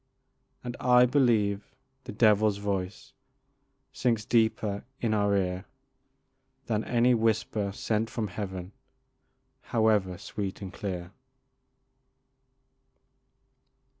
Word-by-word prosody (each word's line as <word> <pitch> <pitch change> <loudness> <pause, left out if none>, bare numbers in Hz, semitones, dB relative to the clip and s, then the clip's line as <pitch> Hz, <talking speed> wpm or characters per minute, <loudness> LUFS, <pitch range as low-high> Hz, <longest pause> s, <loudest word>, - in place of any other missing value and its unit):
And 120 0 -5
I 125 0 +6
believe 110 -7 +1 0.3
the - - -6
devil's 105 -2 +3
voice 100 -2 -4 0.8
Sinks 115 -4 0
deeper 110 -3 +1 0.2
in 115 -2 0
our 100 -1 +2
ear 90 0 -2 1.0
Than 110 -1 -1
any 120 +1 +3
whisper 110 -3 0
sent 110 +2 -1
from 110 -3 -3
Heaven, 95 -1 -6 0.9
However 105 -5 +1
sweet 100 0 -5
and 95 -3 -7
clear. 90 -3 -5
105 Hz, 90 wpm, -28 LUFS, 100-115 Hz, 1.0 s, I